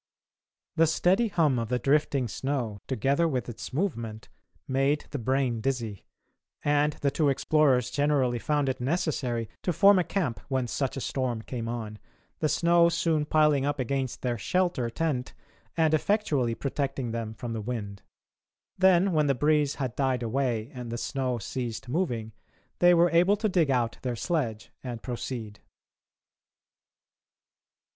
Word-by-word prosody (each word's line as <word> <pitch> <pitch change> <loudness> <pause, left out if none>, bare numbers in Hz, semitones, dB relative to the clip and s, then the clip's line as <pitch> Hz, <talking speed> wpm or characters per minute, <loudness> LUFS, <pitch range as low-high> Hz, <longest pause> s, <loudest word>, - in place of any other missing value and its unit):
The 165 0 +5
steady 185 +8 +2
hum 155 - +2
of 115 -1 -3
the 125 - +1
drifting 140 0 +1
snow, 120 -3 -3
together 140 +6 +1
with 125 -8 -2
its 115 -1 -7
movement, 115 - -3 0.4
made 135 +3 +1
the 145 - -3
brain 130 -1 0
dizzy, 115 -6 -3 0.6
and 145 +1 +3
the 140 - +3
two 145 0 +2
explorers 135 -3 +2
generally 140 -4 +1
found 145 +2 0
it 130 -1 -2
necessary 130 -6 -1
to 180 - 0
form 195 +3 +6
a - - +2
camp 160 - -2
when 130 -2 0
such 135 +3 -2
a - - -3
storm 125 -5 -2
came 115 -2 -5
on, 110 -3 -5 0.4
the 155 - +1
snow 170 +1 +4
soon 165 -2 +1
piling 150 -2 +3
up 145 +1 0
against 130 0 -2
their 120 -3 -1
shelter 175 - 0
tent 135 -1 -2 0.4
and 160 -1 +3
effectually 155 - +1
protecting 135 -1 -3
them 115 -1 -4
from 120 0 -5
the 110 - -3
wind. 100 -4 -5 0.8
Then, 190 0 +5
when 155 -3 +2
the 140 - +2
breeze 150 +1 +2
had 130 -4 -3
died 130 -3 0
away 120 -2 -1
and 125 -2 -7
the 120 - -3
snow 130 0 -2
ceased 120 +3 -5
moving, 120 - -2 0.5
they 175 0 +6
were 170 +1 +4
able 180 +5 +4
to 215 +1 0
dig 175 -7 +2
out 120 -3 0
their 125 -2 -2
sledge 120 -6 -2
and 120 -3 -6
proceed. 115 -4 -5
135 Hz, 150 wpm, -27 LUFS, 120-155 Hz, 0.8 s, form